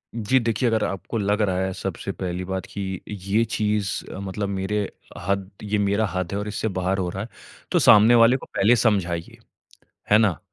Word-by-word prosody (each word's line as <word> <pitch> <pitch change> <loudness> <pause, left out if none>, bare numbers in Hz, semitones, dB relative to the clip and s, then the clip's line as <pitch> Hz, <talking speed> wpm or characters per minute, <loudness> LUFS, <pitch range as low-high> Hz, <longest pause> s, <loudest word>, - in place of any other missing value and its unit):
जी, 120 +3 +2
देखिए 115 +1 0
अगर 110 -1 +1
आपको 95 +4 -3
लग 105 0 +1
रहा 95 -3 +1
है 95 0 -1
सबसे - - -4
पहली 90 -1 -4
बात 95 0 -3
कि 95 -2 -5
ये 100 +2 0
चीज़ 105 -2 0 0.2
मतलब 100 +1 -4
मेरे 95 +2 -2 0.5
हद 100 -1 -1
ये 105 0 -1
मेरा 100 +2 +1
हद 90 -2 -2
है 100 - -2
और 105 - -4
इससे 105 +1 -2
बाहर 95 +1 0
हो 90 -2 -1
रहा 95 +3 -4
है, 115 - -9 0.4
तो - - +3
सामने 110 +3 +7
वाले 115 +2 +6
को - - -11
पहले 110 +5 +3
समझाइए, 95 -8 0 0.7
है 105 - +7
ना? 100 -9 +2
100 Hz, 195 wpm, -23 LUFS, 95-110 Hz, 0.7 s, सामने